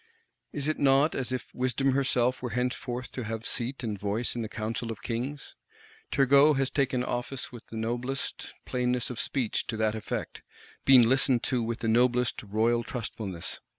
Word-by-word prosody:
Is 145 -1 -2
it 155 - 0
not 140 +3 +4
as 130 -1 -2
if 130 - -4
Wisdom 130 +2 +1
herself 130 -2 +1
were 125 - -3
henceforth 125 +1 -2
to 125 - -4
have 110 +1 -4
seat 125 +3 -2
and 105 -4 -3
voice 105 +5 -1
in 120 - -2
the 110 - -4
Council 115 +2 -3
of 110 -1 -8
Kings? 125 +4 -4 0.5
Turgot 140 +2 +5
has 135 -1 +1
taken 130 -3 +1
office 125 +2 -3
with 120 -2 -11
the 115 - -7
noblest 120 +4 -3
plainness 125 0 0
of 120 - -6
speech 130 -6 -1
to 115 - -3
that 110 -1 +1
effect; 110 -1 -4 0.4
been 125 -4 +8
listened 130 -1 +3
to 125 -2 +1
with 115 0 -3
the 115 - -1
noblest 120 +1 +2
royal 115 +3 +1
trustfulness. 105 -8 -5
125 Hz, 175 wpm, -28 LUFS, 115-130 Hz, 0.5 s, been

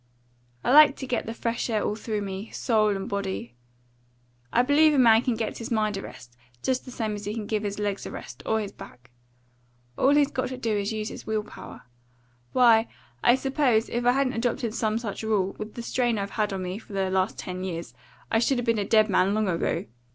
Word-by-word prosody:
I - - +1
like 295 0 +8
to 265 - -6
get 250 -4 -2
the 225 - -3
fresh 235 +1 -2
air 215 -2 0
all - - 0
through 215 -1 -3
me, 195 +2 -5
soul 215 -4 +1
and 195 0 -4
body. 190 - -3 1.0
I 245 - +4
believe 295 +3 +5
a - - +2
man 230 -3 +6
can 250 -2 0
give 220 -1 -3
his 230 +2 -6
mind 215 -3 0
a 195 - -4
rest, 120 -8 -11 0.3
just 260 -1 0
the - - -9
same 225 -3 -3
as 205 -1 -6
he 210 +2 -3
can 220 -2 -4
give 215 0 -1
his 205 -1 -3
legs 205 -1 -2
a - - -6
rest, 125 +3 -9
or 220 - +1
his 205 -2 -4
back. 125 0 -14 0.9
All 280 +2 +5
he's 290 -1 +3
got 255 - -1
to 255 - -6
do 225 -3 -1
is 200 0 -1
to 220 - -3
use 215 0 -3
his - - -10
will 215 -1 0
power. - - -11 0.7
Why, 230 -3 +5 0.4
I 240 - +6
suppose, 265 -4 +1
if 240 +1 -2
I 245 0 +4
hadn't 270 -1 +1
adopted 230 -1 -1
some 220 -1 0
such 225 -4 -4
rule, 205 -3 0
with 215 0 -7
the 235 - -5
strain 240 -1 0
I've 200 0 -3
had 215 -2 -1
on 190 -1 -3
me 180 +3 -4
for 215 - -14
the 190 -1 0
last 190 +2 0
ten 185 -1 -5
years, 170 -9 -5 0.4
I 225 - +3
should 250 +3 +2
'a' - - -2
been 230 -2 +1
a - - +1
dead 215 +1 +4
man 195 0 +2
long 215 -1 +1
ago. 170 -2 -1
220 Hz, 235 wpm, -26 LUFS, 200-240 Hz, 1.0 s, like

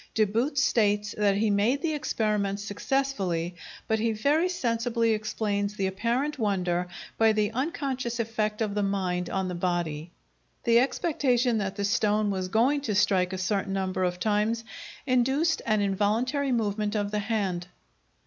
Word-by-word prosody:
De 215 - +4
Boot 235 +8 -1
states 210 -5 +2
that 200 -2 +2
he 215 0 +2
made 215 +7 +2
the 320 -2 0
experiment 210 -8 -1
successfully, 200 -6 -1 0.3
but 220 0 +1
he 225 +1 +1
very 290 +11 +2
sensibly 230 -7 0
explains 210 -1 -1
the 195 - -1
apparent 240 +9 -1
wonder 180 -4 0 0.3
by 225 -1 +5
the 215 -1 +1
unconscious 265 -3 -2
effect 215 -1 -1
of 210 -2 -2
the 205 - 0
mind 185 -3 -1
on 190 -1 -1
the 180 - -3
body. 175 -3 -2 0.5
The 235 -2 +5
expectation 250 -4 +1
that 195 -1 -3
the 200 -1 -1
stone 210 0 +2
was 185 -1 -2
going 245 +9 +2
to 220 -7 -2
strike 185 -2 +2
a 190 - -3
certain 195 +1 -1
number 190 -1 -1
of 180 0 -1
times 215 +3 +1 0.4
induced 265 +5 +2
an 215 -2 +2
involuntary 225 +8 0
movement 210 -2 0
of 205 -1 -1
the 210 - 0
hand. 200 -5 -2
210 Hz, 160 wpm, -27 LUFS, 195-240 Hz, 0.5 s, by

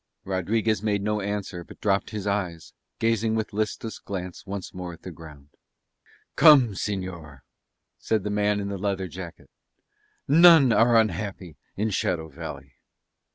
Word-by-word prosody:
Rodriguez 105 +3 0
made 105 -2 0
no 105 0 -1
answer 100 -3 -4
but - - -15
dropped 100 -1 0
his 105 -2 -5
eyes, 95 -5 -3 0.2
gazing 115 0 +1
with 110 -1 -3
listless 110 +1 -3
glance 90 -1 -7
once 100 -1 -6
more 90 -1 -6
at 85 - -15
the 90 - -7
ground. 75 -3 -13 0.9
"Come, 145 -7 +7
señor," 90 - -5 0.6
said 110 -3 0
the 105 - -3
man 105 0 +1
in 100 0 -3
the 100 -1 -4
leather 95 -1 -2
jacket. 90 0 -10 0.8
"None 160 -4 +7
are 115 +1 +5
unhappy 95 -5 -2 0.2
in 105 +2 0
Shadow 85 -4 -1
Valley." 70 -4 -9
100 Hz, 145 wpm, -25 LUFS, 90-110 Hz, 0.9 s, Come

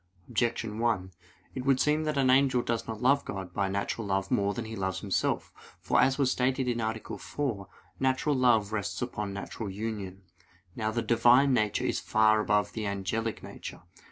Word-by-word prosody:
Objection 115 -2 -1
1: 110 -6 0 0.4
It 130 - -4
would 135 -1 +3
seem 150 +1 +2
that 155 -1 -1
the 140 - +2
angel 130 -1 +4
does 115 -1 -2
not 110 +1 -5
love 140 +2 +4
God 95 -3 -6
by 100 +1 0
natural 100 +2 -2
love 95 0 -1
more 100 0 +1
than 120 - -4
he 110 0 -6
loves 95 -2 -2
himself. 100 -2 -1 0.3
For, - - +2
as 135 0 +3
was 135 -3 +2
stated 130 +1 0
(A. 110 -2 -1 0.2
4), 115 -10 -3 0.3
natural 130 +3 +1
love 115 -5 +3
rests 105 -2 -2
upon 105 -5 -4
natural 100 +2 -5
union. 100 -2 -5 0.5
Now 110 -2 -1
the 115 +1 -1
Divine 120 +4 +5
nature 110 -4 +1
is - - 0
far 110 0 +3
above 105 -1 +1
the 110 -2 -3
angelic 100 +3 -2
nature. - - -9
115 Hz, 180 wpm, -29 LUFS, 100-125 Hz, 0.5 s, Divine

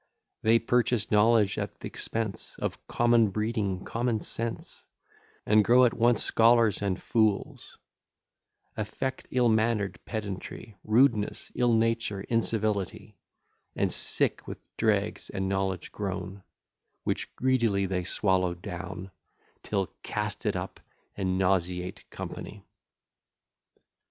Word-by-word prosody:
They 115 +1 +5
purchase 120 -1 +1
knowledge 105 -1 +4
at - - -5
th'expense 110 -3 -4
Of - - -4
common 120 -2 +3
breeding, 105 -3 -2
common 115 -2 -1
sense, 115 0 -5 0.6
And 105 0 +5
grow 125 +4 +6
at 120 - +2
once 120 -1 +3
scholars 115 -2 +4
and 100 -2 -1
fools; 110 -4 0 1.0
Affect 130 +5 -4
ill 125 -1 +2
manner'd 110 -2 +1
pedantry, 105 0 -6
Rudeness, 110 -1 +2
ill 120 -1 +2
nature, 115 -3 0
incivility, 110 -2 -1 0.6
And, - - 0
sick - - +1
with - - -10
dregs - - 0
and 95 0 -2
knowledge 95 -2 -2
grown, 100 -1 -5 0.6
Which - - -3
greedily 120 -7 +2
they 90 -1 -1
swallow 90 -1 +1
down, 90 +2 -7 0.5
Still 100 -2 0 0.2
cast - - -3
it - - +1
up, - - -5 0.4
and 95 -2 -1
nauseate 90 -1 -1
company. - - -8
105 Hz, 110 wpm, -28 LUFS, 95-115 Hz, 1.0 s, grow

